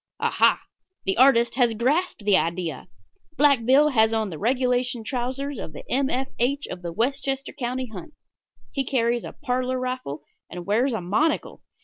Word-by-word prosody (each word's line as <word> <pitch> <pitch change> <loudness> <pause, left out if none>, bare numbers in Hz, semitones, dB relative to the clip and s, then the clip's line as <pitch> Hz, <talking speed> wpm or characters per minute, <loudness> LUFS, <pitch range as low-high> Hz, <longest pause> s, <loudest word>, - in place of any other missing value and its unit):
Aha! - - +3 0.5
the 190 - +1
artist 240 -2 +5
has 240 -3 +2
grasped 270 - 0
the 205 -2 +5
idea. 170 -1 -1 0.5
Black 280 -5 +4
Bill 275 +5 +5
has 220 -4 +3
on 220 -3 -1
the 155 - -7
regulation 250 0 0
trousers 260 +3 -3
of 155 - -7
the - - -10
M. 270 +1 +2
F. 265 +2 -2
H. 280 +4 0
of 180 - -6
the 170 -1 -5
Westchester 270 +6 -1
County 255 0 -3
Hunt. 225 - -10 0.6
He 275 - -1
carries 240 -2 0
a - - -7
parlor 255 +1 -1
rifle, 255 - -4 0.3
and 175 0 -7
wears 235 +7 +2
a 220 - -2
monocle. 215 - 0
245 Hz, 165 wpm, -24 LUFS, 220-270 Hz, 0.6 s, artist